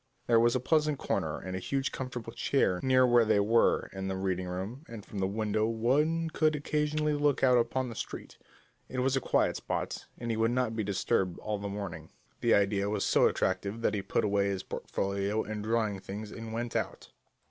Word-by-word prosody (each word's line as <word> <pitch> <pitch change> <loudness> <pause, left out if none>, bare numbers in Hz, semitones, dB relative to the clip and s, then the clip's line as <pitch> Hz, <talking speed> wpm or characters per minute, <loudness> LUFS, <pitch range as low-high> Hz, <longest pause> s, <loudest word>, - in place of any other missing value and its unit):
There 115 -1 +4
was 120 +2 +3
a - - +2
pleasant 150 +2 +2
corner - - -1
and 95 0 -5
a - - -2
huge 135 +7 -1
comfortable 125 -3 -5
chair 120 -6 +1
near 130 -1 +4
where 120 -1 +5
they 110 -2 +3
were 115 +3 +3
in 95 0 -4
the 95 - -2
reading 95 -1 -2
room, 95 - -5
and 115 -3 -8
from 100 - -6
the 95 - +1
window 110 +1 0
one 150 +9 +1
could 155 -1 +2
occasionally 150 +1 0
look 145 -2 +1
out 125 -2 +6
upon 130 +2 0
the - - -6
street. - - -7 0.5
It 130 - -6
was 130 +1 +2
a 135 - +1
quiet - - +1
spot, - - -4
and 120 -1 -3
he 110 - -1
would 115 +1 +3
not 120 -2 0
be 110 - -1
disturbed 95 -2 0
all 105 -1 -3
the 100 0 -4
morning. 90 -6 -6 0.3
The 120 - +4
idea 100 0 +2
was 105 -1 0
so - - +4
attractive 100 +4 -1
that - - +1
he 105 - -1
put 95 - 0
away 100 -1 +2
his 95 -2 -2
portfolio 100 +2 -2
and 105 0 -5
drawing 110 -3 0
things 105 +3 -7
and 115 -1 -7
went 120 +1 -4
out. - - -3
110 Hz, 210 wpm, -30 LUFS, 100-130 Hz, 0.5 s, out